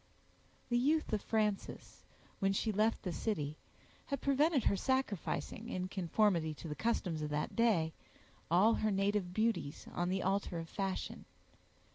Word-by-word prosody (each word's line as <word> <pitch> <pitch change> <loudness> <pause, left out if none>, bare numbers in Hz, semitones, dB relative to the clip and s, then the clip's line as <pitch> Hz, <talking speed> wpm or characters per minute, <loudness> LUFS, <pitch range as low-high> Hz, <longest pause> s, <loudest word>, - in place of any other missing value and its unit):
The 240 0 +3
youth 300 0 +2
of 210 - +1
Frances, 210 -3 -2 0.3
when 195 -1 +2
she 220 +3 0
left 215 +2 +1
the 180 -4 -2
city, 155 -10 -2 0.5
had 280 -2 -2
prevented 280 0 +3
her - - +3
sacrificing, 230 - -1
in 185 -4 -3
conformity 175 -4 +1
to 165 - -8
the 150 - -3
customs 180 -5 -1
of 150 - -2
that 150 +1 -2
day, 200 -9 +3 0.6
all 190 +7 +5
her 215 - +1
native 195 -2 +1
beauties 215 -8 -1
on 175 0 0
the 190 0 0
altar 190 -2 0
of 165 0 -5
fashion. 195 -2 -3
200 Hz, 150 wpm, -35 LUFS, 175-225 Hz, 0.6 s, all